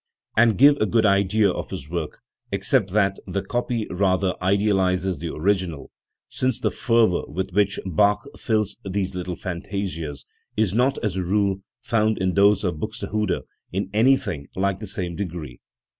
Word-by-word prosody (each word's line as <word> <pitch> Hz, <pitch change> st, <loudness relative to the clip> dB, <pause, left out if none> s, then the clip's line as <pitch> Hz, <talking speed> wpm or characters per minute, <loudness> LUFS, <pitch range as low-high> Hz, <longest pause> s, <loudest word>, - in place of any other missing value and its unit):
47 115 Hz, +1 st, +6 dB
and 105 Hz, -, -1 dB
give 145 Hz, +2 st, +7 dB
a 110 Hz, -, +2 dB
good 115 Hz, -2 st, +3 dB
idea 100 Hz, 0 st, +3 dB
of -, -, -5 dB
his 70 Hz, -, -6 dB
work, 85 Hz, -1 st, -4 dB, 0.3 s
except 95 Hz, -, +1 dB
that 100 Hz, 0 st, +1 dB
the 95 Hz, +1 st, -2 dB
copy 120 Hz, -2 st, -2 dB
rather 95 Hz, 0 st, +1 dB
idealises 95 Hz, -2 st, +1 dB
the 85 Hz, -1 st, -4 dB
original, 90 Hz, -3 st, -1 dB, 0.4 s
since 130 Hz, -2 st, -1 dB
the -, -, 0 dB
fervour 115 Hz, -7 st, +2 dB
with 95 Hz, +4 st, -4 dB
which 100 Hz, +2 st, +1 dB
Bach 100 Hz, -, +2 dB
fills 110 Hz, -3 st, -1 dB
these 95 Hz, 0 st, -2 dB
little 90 Hz, -1 st, -4 dB
fantasias, 85 Hz, -6 st, -5 dB, 0.3 s
is 105 Hz, -4 st, +2 dB
not, 130 Hz, +5 st, +2 dB
as 100 Hz, -4 st, -1 dB
a -, -, 0 dB
rule, 100 Hz, +1 st, +1 dB, 0.2 s
found 110 Hz, -3 st, +1 dB
in 95 Hz, -1 st, 0 dB
those 100 Hz, +1 st, +4 dB
of 85 Hz, -5 st, -1 dB
Buxtehude 105 Hz, +3 st, -2 dB, 0.3 s
in 95 Hz, +1 st, -3 dB
anything 105 Hz, -, +2 dB
like 95 Hz, 0 st, 0 dB
the 105 Hz, -, -6 dB
same 90 Hz, -3 st, -3 dB
degree. 80 Hz, -8 st, -6 dB
100 Hz, 160 wpm, -23 LUFS, 90-105 Hz, 0.4 s, give